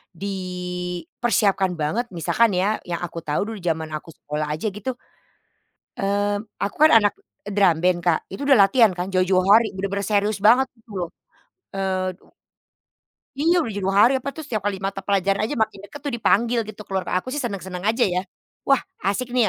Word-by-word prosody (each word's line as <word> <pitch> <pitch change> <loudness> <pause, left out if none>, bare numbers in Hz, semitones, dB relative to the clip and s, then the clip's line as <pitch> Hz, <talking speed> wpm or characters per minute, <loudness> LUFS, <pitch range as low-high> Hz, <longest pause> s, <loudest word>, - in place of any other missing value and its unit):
dipersiapkan 180 +1 -1
banget. 165 +11 -1
Misalkan 205 +5 +2
ya, 200 +4 +1
yang 175 0 -3
aku 170 -1 -5
tahu 155 0 -2
dulu 220 - -6
zaman 160 -2 -2
aku 155 +2 -6
sekolah 150 0 -4
aja, 195 +8 -3
gitu, 210 +6 -5 1.0
eee, 205 0 0 0.2
aku 200 - -2
kan 310 - +7
anak 205 - +2 0.4
drum 195 -5 +3
band, 180 -1 +3
Kak. 170 -2 +3
Itu 235 +9 -5
udah 275 -4 +6
latihan 225 -5 +5
kan 180 +2 -3
jauh-jauh 185 0 +3
hari. 220 0 +5
Bener-bener 200 +1 -3
serius 205 0 +1
banget 250 +5 +5
itu 225 0 -28
loh. 170 - -3 0.7
Eee 185 -1 -1
u - - -23 1.0
Iya, 330 +6 +3
udah 225 - -4
jauh-jauh 195 -1 -1
hari, 245 +5 +6
apa 280 - -5
tuh, 315 - -8
setiap 215 -6 -2
kali 195 -2 -3
mata 195 0 -3
pelajaran 195 0 +1
aja, 295 - -2
makin 215 -3 -1
dekat 290 - -10
tuh, 285 - -2
dipanggil 235 +1 +2
gitu 215 0 -9
keluar. 190 -1 -1 0.2
Aku 255 - -8
sih 295 - -2
senang-senang 190 -5 -5
aja, 225 +4 +2
ya. 180 0 0 0.4
Wah, 275 -1 +4 0.2
asik 235 +5 -1
nih 245 -3 +3
195 Hz, 180 wpm, -23 LUFS, 180-225 Hz, 1.0 s, kan